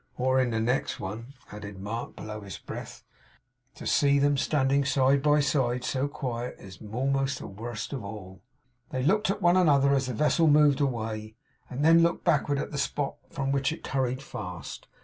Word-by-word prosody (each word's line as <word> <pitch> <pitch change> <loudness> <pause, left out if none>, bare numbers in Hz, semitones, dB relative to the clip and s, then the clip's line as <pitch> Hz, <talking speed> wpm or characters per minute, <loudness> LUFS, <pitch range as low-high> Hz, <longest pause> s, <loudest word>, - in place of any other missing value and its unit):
'Or 130 +1 +2
in 130 -2 +2
the 115 -1 -1
next 120 +4 0
one,' 115 +7 -7 0.2
added 105 -2 -8
Mark 110 +5 -5
below 105 0 -7
his 100 -2 -8
breath. - - -8 0.7
'To - - -10
see 140 -1 +3
them 145 +1 +3
standing 140 0 +2
side 135 0 +3
by 150 +1 +4
side, 130 -3 0
so 135 +2 -1
quiet, 125 -4 -4
is 95 -1 -12
a'most 135 +5 -1
the - - -8
worst 110 +4 -6
of 130 -6 -4
all!' 100 -3 -9 0.5
They 130 -1 -2
looked 205 +7 +2
at 200 +1 -2
one 175 +1 +5
another 140 -6 +4
as 135 -2 +1
the 125 - -3
vessel 155 +5 +3
moved 150 -1 +5
away, 110 -5 -2 0.3
and 135 +4 -2
then 165 +1 +7
looked 170 +1 +1
backward 145 -4 +2
at - - -3
the 145 - -3
spot 140 0 -2
from 135 -4 -2
which 140 0 +1
it 160 - -7
hurried 130 0 -1
fast. 90 - -7
135 Hz, 190 wpm, -28 LUFS, 115-145 Hz, 0.7 s, then